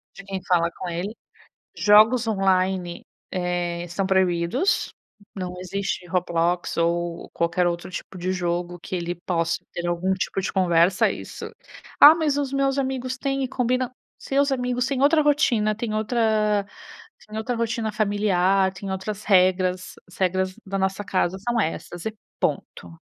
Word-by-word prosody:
De 195 - -10
quem 195 -1 -5
fala 170 -2 +3
com 180 - -5
ele. 185 +6 -4 0.6
Jogos 220 +3 +5
online, 190 -3 0 0.3
eh, 175 -1 -2
são 180 +3 -2
proibidos. 190 - +1 0.4
Não 180 -2 -4
existe 190 0 -3
Roblox 175 -1 0
ou 170 0 -1
qualquer 175 +1 +1
outro 175 +1 -3
tipo 185 - -7
de 185 +1 -2
jogo 175 -1 -2
que 185 - -5
ele 175 0 -3
possa 170 -1 -1
ter 175 0 -4
algum 175 +2 0
tipo 190 +1 -2
de - - -3
conversa 180 0 +3
isso - - -8 0.5
"Ah, 300 +2 +10
mas 305 -4 0
os 280 -2 -1
meus 275 0 +1
amigos 260 -1 -2
tem 275 0 -1
e 260 - -1
combinam". 255 0 0 0.3
"Seus 280 +1 0
amigos 250 -1 0
tem 270 -1 -1
outra 305 +2 +5
rotina, 240 -8 +2
tem 225 0 -4
outra 215 -2 +1 0.6
tem 215 0 -7
outra 230 +3 -2
rotina 230 -1 -1
familiar, 195 -2 +2
tem 195 0 -6
outras 200 +2 -4
regras, 185 -1 +2
as 180 - -16
regras 185 0 0
da 195 0 -3
nossa 190 +1 -1
casa 185 -1 0
são 235 +4 -1
essas 175 0 -4
e 220 - -5 0.2
ponto". 85 -1 -3
190 Hz, 155 wpm, -24 LUFS, 175-225 Hz, 0.6 s, Ah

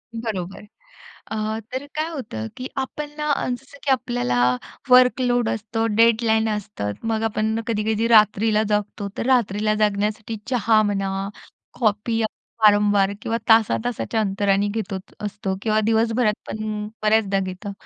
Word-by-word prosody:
बरोबर. 210 -4 -4 0.7
अ, 215 0 -2
तर 265 +2 -3
काय 310 +1 -1
होतं 160 - -5
की 255 +1 -5
आपण 290 +2 -4
ना 300 - -2
अ, - - 0
जसं 270 +3 -6
की 275 - +1
आपल्याला 120 - +1 0.5
वर्कलोड 250 -2 +4
असतो, 225 +1 -2
डेडलाईन 225 -1 +4
असतात. 205 - -3
मग 225 0 0
आपण 220 0 0
कधी-कधी 220 0 0
रात्रीला 215 -1 +4
जागतो, 210 -1 -1
तर - - -2
रात्रीला 215 -4 +2
जागण्यासाठी 210 +1 -1
चहा 225 -3 +3
म्हणा, 195 -1 -1 0.5
कॉफी 225 +1 +1
आपण - - +2 0.4
वारंवार 205 -1 +5
किंवा 230 0 -1
तासा-तासाच्या 225 +1 +2
अंतराने 200 0 +1
घेतच 200 -3 -5
असतो 200 -2 -3
किंवा 215 -1 +2
दिवसभरात 225 0 +2
पण 215 -1 -4 0.2
बऱ्याचदा 215 -2 +3
घेतो. 190 +2 -5
215 Hz, 130 wpm, -22 LUFS, 205-230 Hz, 0.7 s, वारंवार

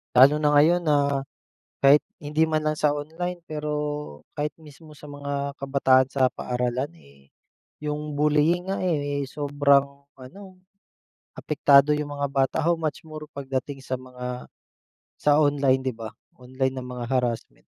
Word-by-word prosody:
Lalo 135 +4 +7
na 150 -1 +2
ngayon 160 +5 +5
na, 140 -4 +1 0.5
kahit 140 +2 +6 0.2
hindi 150 +1 0
man 160 -1 +1
lang 155 - +1
sa 150 -1 +2
online. 165 +5 -4
Pero, 150 -1 -4 0.6
kahit 150 +1 -2
mismo 155 0 -15
sa 150 0 -13
mga 140 -1 -4
kabataan 135 -2 +2
sa 130 -2 +3
paaralan 125 +3 -2
eh. 70 0 -22 0.5
Yung 150 0 -4
bullying 150 +5 +2
nga 195 - -1
eh, 145 -5 -1
sobrang 140 0 +1
ano, 130 +9 -13 1.0
apektado 145 -1 +4
iyong 145 -1 -3
mga 140 0 0
bata. 135 -1 +1
How 170 - +4
much 160 -2 -4
more 155 -1 -9
pagdating 135 0 -4
sa - - -4
mga, 125 -1 -6 0.7
sa 145 -1 +4
online 140 -3 +2
'di 130 - -1
ba? 110 -1 -7 0.3
Online 130 +1 -2
na 130 - -5
mga 125 -1 -6
harassment. 125 -3 -2
145 Hz, 145 wpm, -25 LUFS, 130-150 Hz, 1.0 s, Lalo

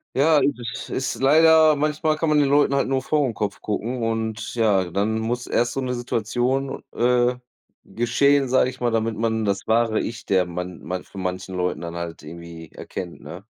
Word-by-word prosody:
Ja, 150 +3 +4
du 145 - +3
das 120 -1 -7
ist 130 -1 -2
leider 160 +2 +6
manchmal 155 +1 0
kann 165 0 0
man 150 -1 +4
den 140 -2 +3
Leuten 145 -1 +3
halt 140 - +1
nur 130 -1 0
vor 150 -1 +1
den 115 - -5
Kopf 100 -1 -3
gucken 115 +4 -3
und 110 -1 -3
ja, 105 -5 +2
dann 105 +5 0
muss 120 +2 -2
erst 120 0 0
so 135 - -2
'ne 125 -1 -2
Situation, 120 +3 -1
äh, 125 0 +2 0.5
geschehen, 130 +4 +2
sage 130 0 +3
ich - - -15
mal, 120 - +1
damit 115 -1 0
man 110 -1 0
das 100 -1 -2
wahre 115 -1 +2
Ich, 115 +2 -6
der 95 -2 +2
man 90 0 -6
man 90 0 -4
von 95 - -9
manchen 95 +1 -4
Leuten 90 -1 -1
dann 85 0 -6
halt 85 -2 -6
irgendwie 85 0 -10
erkennt, 90 -2 -8
ne? 85 +7 -10
115 Hz, 200 wpm, -23 LUFS, 100-135 Hz, 0.5 s, leider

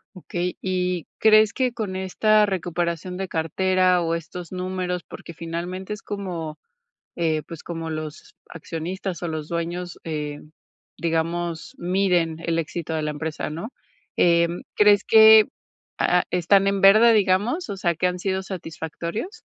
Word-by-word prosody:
Okey. 180 0 -4
Y, 180 -3 -1
¿crees 215 -1 +5
que 255 -2 0
con 210 -5 -4
esta 210 +3 +3
recuperación 175 -2 -2
de 190 0 -4
cartera, 185 +2 +2
o 165 0 0
estos 170 +1 -7
números?, 180 -1 -3
porque - - -10
finalmente 175 +4 -5
es 210 - -12
como, 175 -6 -5 0.6
eh, 160 -2 0
pues, 165 -2 -9
como 165 -1 -5
los 155 0 -7
accionistas 170 +3 -5
o 175 - -1
los 155 -2 -4
dueños, 170 +1 -4
eh, 150 -2 -4 0.6
digamos, 165 0 -2
miden 175 -3 +1
el 165 0 0
éxito 165 0 -4
de 155 - -1
la 150 - -2
empresa, 155 0 -4
¿no?, 170 - -6 0.4
em, 170 0 +3
¿crees 205 -1 +5
que, 220 -1 +8 0.5
ah, 180 0 +3
están 195 +3 +3
en 200 0 +1
verde, 215 +4 +7
digamos, 210 - +1
o 200 - -3
sea, 170 -2 0
que 180 - -1
han 180 0 0
sido 190 0 -1
satisfactorios? 175 - -6
180 Hz, 145 wpm, -23 LUFS, 165-195 Hz, 0.6 s, que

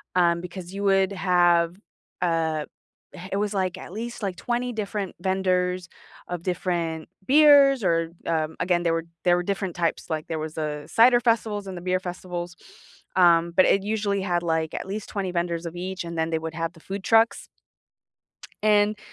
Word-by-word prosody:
um, 170 -1 +3
because 180 0 -8
you 200 +1 -4
would 195 -1 +3
have 175 -3 +3 0.5
uh, 160 -3 0 0.5
eh, 180 - -9
it 195 - 0
was 210 0 -1
like, 185 -2 -1
at 185 - -10
least, 235 +1 -6
like, 190 -2 -2
20 245 +4 -2
different 205 -3 -4
vendors 185 -1 0 0.4
of 175 -1 -4
different 170 -3 -2 0.2
beers 280 -2 +6
or, 165 -2 +1
um, 160 -1 -1
again, 175 -1 +1
there 165 -1 +2
were 165 0 -2 0.2
there 175 -1 +4
were 175 - -1
different 195 -1 -3
types, 170 0 -1
like, 155 -1 -3
there 160 -1 -3
was 155 0 -6
a 150 -2 -3
cider 240 +7 +5
festivals 220 -4 0
and 185 -1 -6
the - - -7
beer 185 +1 0
festivals, 180 -1 -6 0.6
um, 170 -2 +5
but 185 - +6
it 195 - +3
usually 205 -1 -1
had, 175 -2 0
like, 160 -2 -1
at - - -5
least 205 +2 -5
20 195 -3 -3
vendors 170 -1 -2
of 170 0 -6
each 185 +1 -4
and 170 0 -6
then 160 0 0
they 160 -1 0
would 160 0 -5
have 165 0 -3
the 165 - -17
food 195 +4 -6
trucks 225 +1 +3 1.2
and, 210 0 +3
180 Hz, 185 wpm, -25 LUFS, 170-200 Hz, 1.2 s, beers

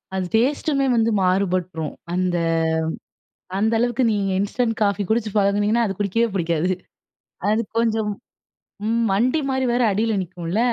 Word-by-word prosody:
அது 190 -1 -1
டேஸ்ட்டுமே 275 +4 +2
வந்து 230 -1 +3
மாறுபட்ரும். 180 -4 0 0.2
அந்த 180 -1 0 1.2
அந்த 220 +3 +2
அளவுக்கு 240 +2 +1
நீங்க 200 -2 0
இன்ஸ்டன்ட் 225 +3 0
காஃபி 200 0 +1
குடிச்சு 220 -1 0
பழகுனீங்கன்னா, 205 +3 +2
அது 195 - -3
குடிக்கவே 210 +3 +1
புடிக்காது. 170 -1 0 0.8
அது 215 +1 +2 0.2
கொஞ்சம் 220 -2 +1 0.8
ம் 230 +1 +1
மண்டி 245 +10 +2
மாரி 265 -1 0
வேற 245 - +2
அடில 220 +3 0
நிக்கும்ல! 175 +2 -4
210 Hz, 130 wpm, -22 LUFS, 185-230 Hz, 1.2 s, வந்து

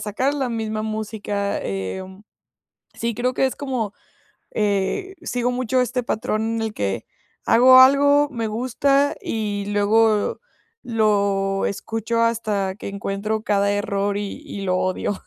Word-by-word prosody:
sacar 240 +7 -1
la 270 -3 -1
misma 220 -2 -3
música. 215 -2 -3
Em, 185 - -5 0.7
sí, 235 0 -2
creo 250 +2 -1
que 265 - +2
es 260 - -4
como, 255 -7 -3 0.6
eh, 210 - -1
sigo 245 0 -1
mucho 255 +1 +1
este 250 0 -1
patrón 220 0 -1
el 220 -1 -2
que, 95 -1 -2 0.4
hago 255 +2 +8
algo, 285 +2 +5
me 230 -3 -2
gusta, 275 +5 +1
y 205 -2 -3
luego 210 +1 +2 0.4
lo 200 -4 +1
escucho 225 +3 -2
hasta 215 -4 0
que 210 - -8
encuentro 200 +2 -3
cada 200 -2 +2
error 205 0 -1
y 205 +7 -5
y 200 - -6
lo 185 -1 +1
odio, 185 +2 -2
220 Hz, 135 wpm, -22 LUFS, 200-245 Hz, 0.7 s, hago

